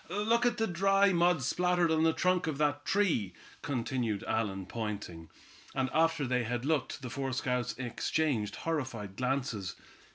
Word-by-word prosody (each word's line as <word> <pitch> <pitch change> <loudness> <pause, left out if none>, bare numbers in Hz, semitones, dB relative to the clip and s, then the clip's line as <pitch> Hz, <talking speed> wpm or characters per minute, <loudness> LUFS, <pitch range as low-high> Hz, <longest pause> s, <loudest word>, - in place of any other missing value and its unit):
"Look 230 +4 +2
at 240 0 0
the 225 - +2
dry 195 +1 +3
mud 170 -4 +3
splattered 175 +3 +2
on 160 0 +3
the 165 - +5
trunk 180 +1 +1
of 155 -3 -2
that 145 -1 0
tree;" 155 - +1 0.3
continued 120 -5 -2
Allan, 100 -4 -1
pointing. 100 -7 -5 0.5
And 130 -1 0
after 165 -2 +2
they 125 -1 +1
had 120 +2 -2
looked, 145 -2 -1
the 125 - -4
four 135 -2 -2
scouts 125 -1 -1
exchanged 125 -1 -1
horrified 130 -11 -3
glances. 125 - -2
135 Hz, 155 wpm, -31 LUFS, 115-170 Hz, 0.5 s, the